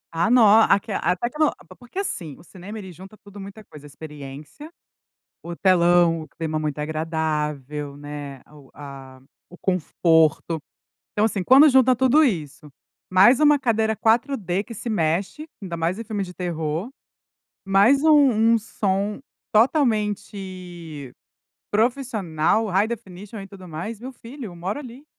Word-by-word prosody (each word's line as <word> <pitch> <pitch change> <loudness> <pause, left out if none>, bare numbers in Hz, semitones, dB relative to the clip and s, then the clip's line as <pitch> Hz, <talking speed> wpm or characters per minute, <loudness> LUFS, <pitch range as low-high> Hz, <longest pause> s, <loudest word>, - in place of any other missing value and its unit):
Ah, 170 +7 +1
no 245 0 +6
aqui 215 0 +4
até 180 +2 0
que 245 - -12
eu 310 - +6
no - - +1
p - - -20
p - - -15
porque, 245 +7 -15
assim, 175 - -4
o - - -17
cinema 190 +5 -10
ele 190 -3 -8
junta 190 +5 -13
tudo 205 -1 -14
muita 200 +2 -10
coisa: 150 -6 -14
experiência, 145 - -11 0.7
o 170 0 -7
telão, 175 -2 +3
o 155 - -12
clima 160 -1 -5
muito 150 -1 -3
agradável, 150 -2 -3
né, 145 -2 -8
o 145 -3 -17
a 135 -2 -11 0.3
o 180 - -13
conforto. 165 -3 +1 0.5
Então, 210 - +1
assim, 205 -4 0
quando 270 +9 +7
junta 260 -1 +4
tudo 265 +5 +4
isso, 150 - -2 0.4
mais 200 +9 +6
uma 295 -1 +5
cadeira 220 -4 0
4D 220 -5 0
que 230 - -10
se 230 +2 -5
mexe, 190 - -1 0.2
ainda 170 -3 -5
mais 170 +5 -1
em 230 - -6
filmes 205 -3 -3
de 180 - -11
terror, 170 - -3 0.8
mais 205 +9 +4
um 260 -8 +5
um - - +4
som 205 -1 -2 0.3
totalmente 195 - -1 0.6
profissional, 220 - 0
high 195 +2 +1
definition, 205 -2 -8
e 195 - -9
tudo 185 -2 -13
mais, 200 +8 -6
meu 260 +2 -7
filho, 240 -4 -10
moro 180 +9 -4
ali. 260 +1 -11
190 Hz, 150 wpm, -23 LUFS, 160-230 Hz, 0.8 s, quando